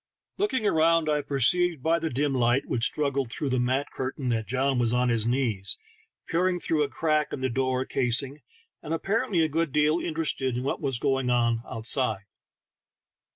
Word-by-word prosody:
Looking 325 Hz, -, 0 dB
around, 165 Hz, -3 st, +3 dB
I 150 Hz, 0 st, +1 dB
perceived 145 Hz, +3 st, +1 dB
by 165 Hz, +1 st, +2 dB
the 160 Hz, 0 st, -2 dB
dim 140 Hz, +2 st, 0 dB
light 125 Hz, +2 st, +2 dB
which 115 Hz, -1 st, -1 dB
struggled 140 Hz, -4 st, -2 dB
through 145 Hz, -, -3 dB
the 130 Hz, -, +1 dB
mat 130 Hz, +4 st, 0 dB
curtain 130 Hz, 0 st, -4 dB
that 110 Hz, -2 st, -1 dB
John 135 Hz, +1 st, 0 dB
was 120 Hz, -1 st, +2 dB
on 125 Hz, 0 st, +2 dB
his 115 Hz, -1 st, +1 dB
knees, 120 Hz, -6 st, 0 dB, 0.5 s
peering 180 Hz, +2 st, +1 dB
through 160 Hz, -2 st, 0 dB
a 145 Hz, -, 0 dB
crack 155 Hz, +3 st, 0 dB
in 130 Hz, -, -5 dB
the 130 Hz, -, 0 dB
door 130 Hz, +1 st, 0 dB
casing, 135 Hz, +3 st, 0 dB, 0.4 s
and 160 Hz, +1 st, -3 dB
apparentl^^ 195 Hz, -2 st, 0 dB
a -, -, +1 dB
good 160 Hz, 0 st, -1 dB
deal 150 Hz, +3 st, +2 dB
inter 165 Hz, -1 st, -2 dB
ested 130 Hz, -5 st, 0 dB
in 125 Hz, -, -3 dB
what 135 Hz, -, -2 dB
was 135 Hz, -4 st, 0 dB
going 135 Hz, -1 st, 0 dB
on 115 Hz, -2 st, +1 dB
outside. 110 Hz, -2 st, 0 dB
135 Hz, 185 wpm, -26 LUFS, 125-155 Hz, 0.5 s, around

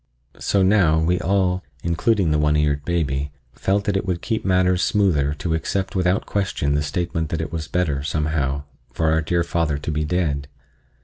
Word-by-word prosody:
So 100 Hz, -1 st, +2 dB
now 95 Hz, -5 st, +4 dB
we 90 Hz, +3 st, +1 dB
all—including 90 Hz, 0 st, 0 dB
the 75 Hz, -, +2 dB
one 75 Hz, 0 st, +2 dB
eared 75 Hz, -1 st, +1 dB
baby—felt 75 Hz, +4 st, -2 dB
that 100 Hz, -1 st, -1 dB
it 95 Hz, -, +1 dB
would 90 Hz, -3 st, -3 dB
keep 110 Hz, -2 st, -1 dB
matters 90 Hz, -1 st, +2 dB
smoother 75 Hz, -10 st, +2 dB
to 80 Hz, +1 st, -2 dB
accept 95 Hz, +4 st, -2 dB
without 90 Hz, +2 st, +1 dB
question 95 Hz, -8 st, -1 dB
the 75 Hz, -, +1 dB
statement 80 Hz, +2 st, -2 dB
that 80 Hz, -, -2 dB
it 80 Hz, -, -4 dB
was 80 Hz, -2 st, -4 dB
better, 80 Hz, -7 st, 0 dB
somehow, 70 Hz, -2 st, -1 dB, 0.3 s
for 80 Hz, -1 st, +1 dB
our 80 Hz, 0 st, +2 dB
dear 85 Hz, +2 st, 0 dB
father 80 Hz, -4 st, 0 dB
to 75 Hz, +2 st, -4 dB
be 75 Hz, 0 st, -1 dB
dead. 75 Hz, -4 st, -1 dB
80 Hz, 175 wpm, -22 LUFS, 75-90 Hz, 0.3 s, now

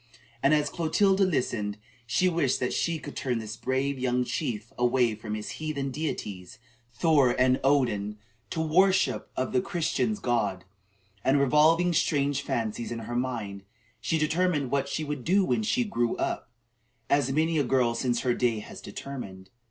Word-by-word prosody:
And 135 Hz, -, +4 dB
as 150 Hz, -1 st, 0 dB
Clotilda 195 Hz, +4 st, +2 dB
listened, 110 Hz, -, -1 dB, 0.3 s
she 185 Hz, +9 st, +2 dB
wished 165 Hz, -7 st, +1 dB
that 125 Hz, -, -1 dB
she 170 Hz, -1 st, 0 dB
could 150 Hz, -, -9 dB
turn 125 Hz, -3 st, -1 dB
this 110 Hz, -1 st, -5 dB
brave 130 Hz, +3 st, -1 dB
young 125 Hz, 0 st, +1 dB
chief 115 Hz, -5 st, -3 dB
away 125 Hz, -1 st, +2 dB
from 105 Hz, 0 st, -5 dB
his 105 Hz, -1 st, -5 dB
heathen 140 Hz, -3 st, -2 dB
deities, 105 Hz, -, -5 dB, 0.3 s
Thor 140 Hz, -1 st, +3 dB
and 130 Hz, +1 st, +4 dB
Odin, 110 Hz, -7 st, +1 dB, 0.3 s
to 160 Hz, -, -2 dB
the -, -, 0 dB
worship 190 Hz, +4 st, +3 dB
of 130 Hz, -, -1 dB
the 125 Hz, -, +2 dB
Christians' 175 Hz, +6 st, -1 dB
God; 105 Hz, -, -1 dB, 0.6 s
and, 135 Hz, +2 st, +3 dB
revolving 160 Hz, +5 st, +4 dB
strange 140 Hz, -3 st, +1 dB
fancies 115 Hz, -3 st, -3 dB
in 120 Hz, -, -3 dB
her 120 Hz, -, -5 dB
mind, 115 Hz, -6 st, -3 dB, 0.4 s
she 130 Hz, +8 st, 0 dB
determined 155 Hz, -3 st, +1 dB
what 140 Hz, 0 st, 0 dB
she 155 Hz, -, -2 dB
would 145 Hz, -3 st, -4 dB
do 190 Hz, +5 st, +3 dB
when 220 Hz, -, +1 dB
she 230 Hz, +3 st, +1 dB
"grew 120 Hz, -, -1 dB
up," -, -, -2 dB, 0.6 s
as 140 Hz, -2 st, +2 dB
many 160 Hz, +2 st, +1 dB
a -, -, +3 dB
girl 125 Hz, -2 st, +2 dB
since 120 Hz, 0 st, 0 dB
her 125 Hz, -2 st, +1 dB
day 120 Hz, -2 st, +1 dB
has 105 Hz, -, -9 dB
determined. 100 Hz, -5 st, -8 dB
130 Hz, 165 wpm, -27 LUFS, 120-155 Hz, 0.6 s, And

